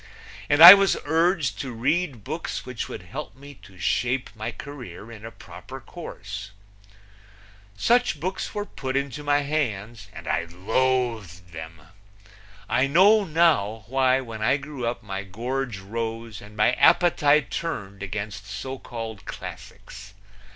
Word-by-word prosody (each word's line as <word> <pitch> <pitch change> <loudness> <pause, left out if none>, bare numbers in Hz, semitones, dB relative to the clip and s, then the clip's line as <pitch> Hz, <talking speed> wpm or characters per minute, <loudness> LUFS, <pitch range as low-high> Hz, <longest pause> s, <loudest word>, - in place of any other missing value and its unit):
And 145 +2 +6
I 175 +2 +16
was 195 -1 +3
urged 160 - +1
to 130 -2 -4
read 130 - -1
books 155 +8 -5
which 125 -2 -5
would - - -7
help 130 - -8
me 140 +2 -12
to 95 - -16
shape 125 +8 -1
my 110 +2 -4
career 115 -7 -10
in 110 -2 -11
a 115 - -6
proper 115 - -11
course. 100 +2 -8 1.3
Such 240 - +2
books 185 +5 -4
were 205 0 -2
put 130 -8 -4
into 140 +1 -3
my 145 0 +2
hands, 115 -8 -3
and 85 -5 -11
I 80 +2 0
loathed 105 -1 -1
them. 80 0 -9 0.9
I 130 - +2
know 200 +8 +5
now 150 - +2
why 130 +2 +2
when 115 -4 -8
I 130 +6 +3
grew 140 -4 -6
up 120 0 -3
my 95 -2 -4
gorge 120 +4 -4
rose 115 +2 -5
and 105 +1 -14
my 105 +3 +4
appetite 145 - +4
turned 100 - -4
against 100 +1 -5
so 130 +7 -6
called 115 -5 -7
classics. 105 +1 -10
120 Hz, 145 wpm, -25 LUFS, 105-145 Hz, 1.3 s, I